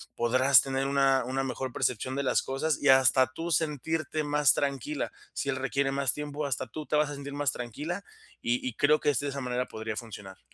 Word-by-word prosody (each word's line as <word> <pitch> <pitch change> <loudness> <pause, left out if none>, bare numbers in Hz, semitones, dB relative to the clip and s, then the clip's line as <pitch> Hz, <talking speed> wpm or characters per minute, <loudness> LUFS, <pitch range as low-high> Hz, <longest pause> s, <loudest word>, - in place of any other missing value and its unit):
podrás 130 +3 +5
tener 135 0 -2
una 135 -1 +3
una 130 +2 -1
mejor 130 0 -4
percepción 125 +2 -1
de 140 - -1
las 130 - +2
cosas 140 +3 -1
y 145 - +3
hasta 130 0 +6
tú 165 +6 -5
sentirte 155 0 -1
más 145 -2 +4
tranquila. 140 +1 -2 0.2
Si - - -3
él 135 - 0
requiere 135 +1 0
más 135 -2 +1
tiempo, 150 0 -4
hasta 130 -2 -2
tú 150 +6 -7
te 150 - -1
vas 150 0 +2
a 145 - -5
sentir 140 0 -7
más 145 -2 +1
tranquila, 150 - -5 0.4
y 120 +2 0
y 125 - -3
creo 150 +4 +4
que - - +1
es 140 -5 +1
de 145 - -2
esa 140 0 -4
manera 125 0 -1
podría 110 0 -5
funcionar. 105 -4 -10
135 Hz, 215 wpm, -28 LUFS, 130-145 Hz, 0.4 s, hasta